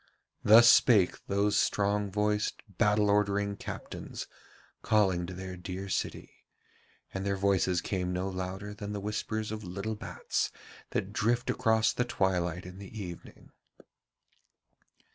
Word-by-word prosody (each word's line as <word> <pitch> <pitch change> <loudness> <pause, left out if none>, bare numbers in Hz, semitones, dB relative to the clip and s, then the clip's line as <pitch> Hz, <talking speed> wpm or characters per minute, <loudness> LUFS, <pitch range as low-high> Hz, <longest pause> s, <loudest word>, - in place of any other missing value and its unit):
Thus 115 +3 +8
spake 105 -5 +5
those 100 +1 +1
strong 100 0 +1
voiced, 105 +1 0 0.2
battle 105 0 +3
ordering 100 0 +1
captains, - - -7 0.6
calling 95 -5 +2
to 95 - -6
their 95 0 -6
dear 90 +2 -6
city, - - -4 0.7
and 95 - -3
their 100 0 0
voices 95 -2 +2
came 90 -1 -2
no 90 +1 -1
louder 95 +2 -5
than 105 0 -6
the 105 - -3
whispers 105 +1 -3
of 110 0 -5
little 100 +5 -4
bats 105 - -2 0.4
that 100 +2 -3
drift 120 +3 +1
across 110 -2 +2
the 125 - +1
twilight 90 -6 -1
in 90 +1 -10
the 100 +2 -9
evening. 90 -4 -9
100 Hz, 130 wpm, -30 LUFS, 95-105 Hz, 0.7 s, Thus